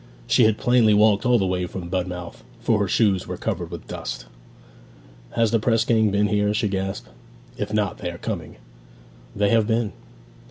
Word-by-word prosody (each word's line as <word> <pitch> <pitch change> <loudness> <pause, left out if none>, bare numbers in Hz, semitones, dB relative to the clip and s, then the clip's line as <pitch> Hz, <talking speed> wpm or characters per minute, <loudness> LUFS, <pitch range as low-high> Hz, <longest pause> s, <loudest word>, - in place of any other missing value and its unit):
She 120 - +4
had 110 -1 +3
plainly 120 -4 +4
walked 105 +2 +4
all 125 -1 +5
the 95 - +1
way 90 -1 -1
from 90 -1 -7
Budmouth, 90 -5 -4 0.2
for 110 - +1
her 100 - +1
shoes 100 -2 +2
were - - -5
covered - - -3
with - - -9
dust. - - -6 1.1
'Has 115 -2 +2
the 115 - +3
press 115 +1 +2
gang 110 -2 +3
been 100 +1 +2
here?' 105 0 +1
she 105 -1 0
gasped. 95 0 -3 0.5
'If - - -4
not 105 -2 -1
they - - -3
are 85 - -7
coming!' 85 -6 -5 0.8
'They 100 0 +2
have 115 -1 +3
been.' 110 -3 0
105 Hz, 185 wpm, -23 LUFS, 95-110 Hz, 1.1 s, all